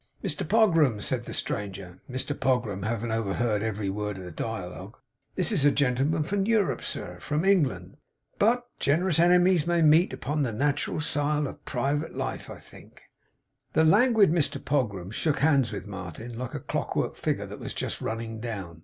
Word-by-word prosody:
'Mr - - -2
Pogram,' 165 - +4
said 120 +3 -2
the - - -7
stranger 95 -3 -4
Mr 130 +3 -3
Pogram 125 -8 0
having 115 0 -2
overheard 110 0 0
every 105 -2 -2
word 105 +1 -3
of 95 - -8
the 90 - -8
dialogue 95 +1 -6 0.4
'this 185 +4 +2
is 175 -10 +3
a 145 - +7
gentleman 140 +3 +1
from 195 +5 -1
Europe, 220 -5 +1
sir; 90 0 -4
from 150 - -1
England, 185 -9 +2
sir. - - -24 0.4
But 245 +3 +1
gen'rous 165 +3 +2
ene 175 +1 +6
mies 180 -4 +3
may 170 -1 +3
meet 160 +4 +5
upon 150 +3 -2
the 130 -4 0
neutral 145 +6 0
sile 150 0 0
of - - -8
private 145 +3 -1
life, - - -4
I - - -8
think.' - - -16 0.7
The 160 - +4
languid 210 +2 +5
Mr 165 -3 +1
Pogram 105 -10 -1
shook 150 +4 +1
hands 140 -5 +3
with 90 - -5
Martin, 100 +4 -7
like 125 +1 -5
a - - -2
clock - - -3
work - - -1
figure - - -2
that - - -9
was - - -6
just - - -3
running 115 0 -4
down. 100 -8 -6
135 Hz, 180 wpm, -27 LUFS, 105-160 Hz, 0.7 s, a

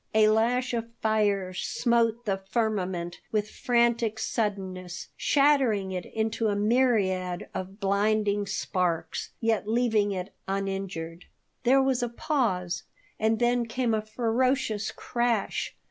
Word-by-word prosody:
A 215 -1 +6
lash 245 +4 +2
of 230 -1 -1
fire 205 -4 +1
smote 235 +3 +1
the 195 -2 -1
firmament 190 -6 -1
with 215 -1 -1
frantic 235 -3 +1
suddenness, 190 -6 -3
shattering 265 -9 +3
it 180 -1 -4
into 220 0 -1
a 205 - +1
myriad 205 -5 +1
of 190 +2 -6
blinding 205 0 +1
sparks, 175 -4 -1
yet 225 -3 0
leaving 220 -3 +2
it 190 0 -4
uninjured. 195 -4 -3 0.4
There 265 +2 +5
was 265 -2 +1
a 240 - -1
pause 210 - -1 0.4
and 220 +1 +2
then 240 0 +2
came 240 0 0
a 215 - +1
ferocious 225 0 0
crash. 235 -4 -1
215 Hz, 120 wpm, -27 LUFS, 195-235 Hz, 0.4 s, A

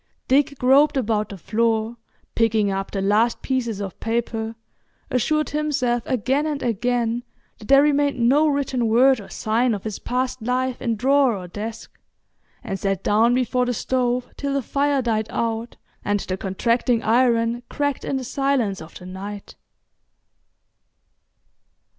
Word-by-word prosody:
Dick 280 +1 +2
groped 275 +4 +4
about 215 -4 0
the 200 - -8
floor 225 +3 0 0.4
picking 220 -3 +2
up 195 0 -3
the 195 -1 -3
last 215 +4 +2
pieces 235 -6 -1
of 195 -3 -6
paper, 225 -1 -2 0.6
assured 305 +5 +1
himself 280 -5 0
again 265 +5 0
and 295 -2 -3
again 240 +1 0 0.4
that 215 - -12
there 275 +1 +6
remained 290 -1 +2
no 270 +6 +4
written 270 -5 0
word 250 +2 +4
or 195 - -12
sign 230 +2 0
of 200 - -7
his 215 -2 -5
past 250 0 -2
life 250 +2 -1
in 230 -3 0
drawer 265 0 +3
or 180 -1 -8
desk, 220 +5 -7 0.6
and 195 -5 -4
sat 195 -1 -1
down 230 +4 +3
before 250 0 +1
the 245 - -1
stove 250 +1 0
till 280 -1 -2
the 275 - 0
fire 280 +1 +1
died 220 -2 0
out 230 0 -3 0.3
and 205 -1 0
the 185 - -3
contracting 230 +5 0
iron 235 0 +2
cracked 285 -2 -2
in - - -2
the 260 - -4
silence 255 -6 0
of 160 +1 -11
the 180 - -12
night. 195 +2 -8
235 Hz, 150 wpm, -22 LUFS, 220-260 Hz, 0.6 s, there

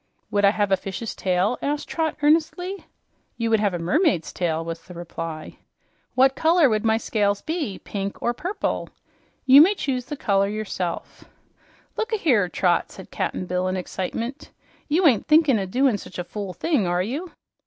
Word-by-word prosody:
"Would 205 0 +1
I - - +7
have 205 -1 0
a 195 - +4
fish's 195 +4 -5
tail?" 185 +5 0
asked 290 +1 -2
Trot 320 -2 -2
earnestly. 335 +5 +1 0.5
"You 230 -1 -1
would 220 - +4
have 205 -3 +1
a - - -1
mermaid's 180 - +1
tail," 165 -2 -1
was 165 0 -5
the 180 - -13
reply. 165 -2 -7 0.6
"What 265 +1 +4
color 320 0 +4
would 215 -2 0
my 220 -1 +3
scales 205 -3 0
be 310 - -3
pink, 200 -1 -5
or 240 - 0
purple?" 365 - -3 0.6
"You 270 +2 +9
may 385 +6 +5
choose 255 -8 -2
the 295 - -6
color 200 -3 +2
yourself." 200 -4 -4 0.7
"Look 445 +2 -2
ahere, 250 - +2
Trot!" 175 -1 +1
said 190 - -12
Cap'n 185 - -2
Bill 180 +1 -1
in 185 0 -1
excitement. 230 +8 -4 0.4
"You 335 +5 +2
ain't 250 -9 +4
thinkin' 305 -6 +5
o' 190 - -3
doin' 250 +1 +2
such 180 - -10
a 180 - -2
fool 200 +1 -6
thing, 255 - 0
are 175 +1 +1
you?" 290 - -5
215 Hz, 175 wpm, -23 LUFS, 185-295 Hz, 0.7 s, You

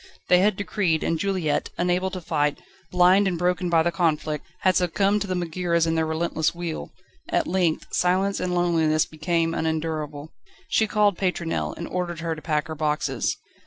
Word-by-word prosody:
They 180 - +6
had 205 +2 +3
decreed; 190 -5 0
and 165 - 0
Juliette, 185 -6 0
unable 180 +1 +1
to 185 -1 -6
fight, 150 -3 0 0.3
blind 185 +2 +5
and 180 -2 -1
broken 180 0 0
by 165 -1 +4
the 175 - +1
conflict, 155 -3 -1
had 185 -1 +3
succumbed 195 +4 +2
to 205 - -2
the 185 - -1
Megaeras 170 -1 0
and 165 0 0
their 160 -1 +1
relentless 160 0 -1
wheel. 170 -2 -5 0.4
At - - +1
length 175 -3 0
silence 190 +2 +1
and 180 -1 -1
loneliness 160 -3 +2
became 165 +1 -1
unendurable. 160 -2 -3 0.4
She 220 - +2
called 205 -3 +2
Pétronelle, 180 -3 -1
and 170 - -5
ordered 175 -2 -3
her 165 0 -1
to 155 - -10
pack 150 -3 -1
her 160 - -5
boxes. 150 -1 -1
170 Hz, 175 wpm, -24 LUFS, 160-180 Hz, 0.4 s, They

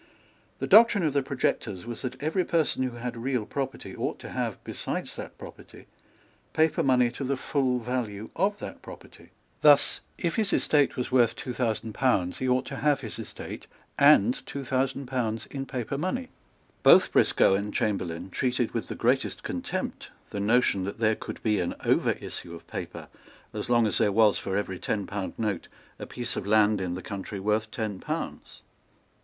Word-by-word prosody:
The - - -2
doctrine 215 -5 +6
of 150 - +1
the 140 - +3
projectors 125 -8 -2
was 120 -1 -6
that 125 0 -5
every 160 +5 +1
person 165 -6 +1
who 125 -2 -2
had 120 0 -4
real 120 -1 -1
property 135 +3 -4
ought - - -2
to - - -8
have, - - -2
besides - - -4
that - - -8
property, - - -12 0.7
paper 160 0 +3
money 125 -3 +3
to 140 - -6
the 135 +1 -1
full 130 -1 0
value 115 -3 -3
of 200 +4 +1
that - - -8
property. - - -13 0.3
Thus, - - +5 0.2
if 170 -3 -1
his 215 -3 +2
estate 145 -2 +3
was 125 - -2
worth 120 -3 +4
two 125 - -5
thousand 115 -2 -1
pounds, 100 -9 +1
he 130 - 0
ought 125 0 +2
to 135 - -6
have 145 -1 +2
his 110 -2 -5
estate 110 - -7 0.3
and 150 - +5
two 140 -1 -5
thousand 135 +1 0
pounds 115 -3 -2
in 135 -1 -4
paper 130 +2 -3
money. 250 - -2 0.5
Both - - +7
Briscoe - - +4
and 100 +2 -1
Chamberlayne 95 -4 -2
treated 125 0 0
with 115 -5 -2
the - - -5
greatest - - 0
contempt - - -4 0.2
the 100 - -3
notion 105 -2 +3
that 100 - -5
there 110 -1 +2
could - - -8
be 105 -2 +2
an 85 - -2
overissue 85 - 0
of 85 - -12
paper - - -7 0.5
as 105 +2 -5
long 120 -1 +4
as 105 - +1
there 105 - +3
was, 105 0 +4
for 95 0 -2
every 95 -3 -3
ten 100 -2 -2
pound 100 -1 -4
note, 105 -5 -2 0.3
a - - -6
piece - - -4
of - - -4
land 105 -1 +4
in 90 -2 -2
the 90 - -7
country 100 +1 -6
worth 105 +2 0
ten 110 -5 -4
pounds. - - -5
120 Hz, 185 wpm, -27 LUFS, 105-135 Hz, 0.7 s, Both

